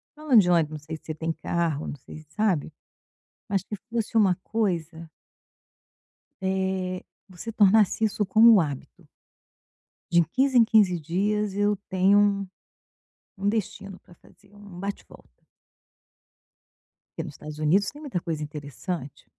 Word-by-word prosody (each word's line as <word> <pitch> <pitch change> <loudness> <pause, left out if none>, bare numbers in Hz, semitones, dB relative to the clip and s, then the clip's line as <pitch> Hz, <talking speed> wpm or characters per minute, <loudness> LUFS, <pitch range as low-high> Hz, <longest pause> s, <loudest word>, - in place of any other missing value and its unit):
falando 295 -7 +4
de 180 - 0
onde, 165 -3 +3
não 155 - -5
sei 155 +2 -7
se - - -30
você 155 - -4
tem 165 +1 -2
carro, 160 -2 -2
não - - -5
sei 155 +3 -12
sabe, 180 -5 -1 0.8
mas 195 -1 0
que 210 - -6
fosse 230 0 -3
uma 190 -4 +4
coisa 170 -7 -2 1.3
eh, 190 -1 -2 0.3
você 185 +5 -8
tornasse 210 0 +4
isso 210 0 -1
como 225 +4 +7
um 200 - +6
hábito. 145 -4 -7 1.0
De 170 -1 +5
15 260 - 0
em 235 - +8
15 200 -6 +3
dias 200 +5 -1
eu 205 0 +2
tenho 200 +1 +3 0.9
um 195 +1 -2
destino 200 -2 -3
pra 175 - -20
fazer, 200 +4 -23
um 200 -3 -12
bate-volta. 200 +2 -9 1.7
Porque 165 - -4
nos 150 -4 -9
Estados 150 0 -9
Unidos 190 +7 +2
tem 295 - -13
muita 275 -12 -3
coisa 165 -3 -4
interessante. 145 +1 -7
190 Hz, 140 wpm, -25 LUFS, 165-210 Hz, 1.7 s, em